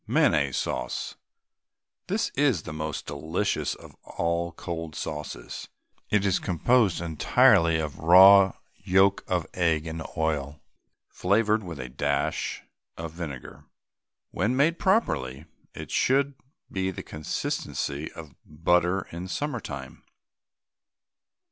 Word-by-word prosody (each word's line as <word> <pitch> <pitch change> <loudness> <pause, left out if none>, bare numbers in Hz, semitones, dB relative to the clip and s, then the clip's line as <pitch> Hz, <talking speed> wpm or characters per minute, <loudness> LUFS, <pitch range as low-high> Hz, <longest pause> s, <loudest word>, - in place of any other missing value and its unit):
MAYONNAISE 70 -4 +2
SAUCE. - - -3 0.9
This 205 +5 0
is 135 - +1
the 75 - -7
most 75 -1 -4
delicious 80 +7 -2
of - - -14
all 85 0 -2
cold 80 -2 -6
sauces. 75 -1 -6 0.4
It 105 -1 +2
is 95 -2 +2
composed 100 +2 +2
entirely 80 0 +4
of 75 -2 -4
raw 95 +3 +8 0.2
yolk 95 +1 +3
of 90 -2 0
egg 80 -3 +1
and 80 0 -5 0.2
oil, 75 -2 -1 0.5
flavoured 105 +3 +1
with 85 -5 -7
a 65 - -5
dash 70 +3 -2 0.3
of 80 -1 -5
vinegar. 75 -7 -8 0.7
When 110 +8 0
made 155 +5 +2
properly 75 - 0 0.3
it - - -8
should 140 +2 +2 0.4
be 95 -1 -1
of 95 - -6
the - - -6
consistency 75 -1 -3
of 80 -4 -10
butter 90 +4 +1
in 85 +2 -6
summer 145 +5 -3
time. 70 - -8
85 Hz, 115 wpm, -26 LUFS, 75-100 Hz, 0.9 s, raw